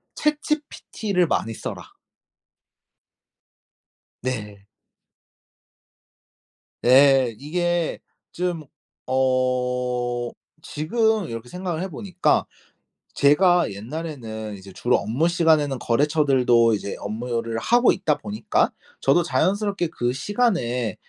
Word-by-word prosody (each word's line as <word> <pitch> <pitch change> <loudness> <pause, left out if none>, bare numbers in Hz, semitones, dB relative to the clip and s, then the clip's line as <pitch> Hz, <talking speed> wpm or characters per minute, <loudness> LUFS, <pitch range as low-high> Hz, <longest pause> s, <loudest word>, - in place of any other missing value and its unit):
ChatGPT를 290 - -1
많이 115 -6 -1
써라. - - -7 2.3
네. 105 -5 -5 2.2
네. 130 -2 +5
이게 175 +4 -1 0.3
좀 175 -2 -2 0.5
어 125 -2 0 0.3
지금 215 +7 0
이렇게 115 +1 -7
생각을 180 -1 -4
해 190 - -2
보니까 185 0 0 0.7
제가 175 +5 +4
옛날에는 110 -2 -6
이제 95 0 -12
주로 120 +6 +1
업무 125 +11 0
시간에는 160 -5 +2
거래처들도 130 -4 +3
이제 100 -1 -3
업무를 115 +1 -3
하고 240 - +4
있다 165 -6 0
보니까 105 +2 0 0.3
저도 140 +6 +3
자연스럽게 200 +1 0
그 120 -6 -2
시간에 130 - 0
135 Hz, 210 characters per minute, -23 LUFS, 120-175 Hz, 2.3 s, 네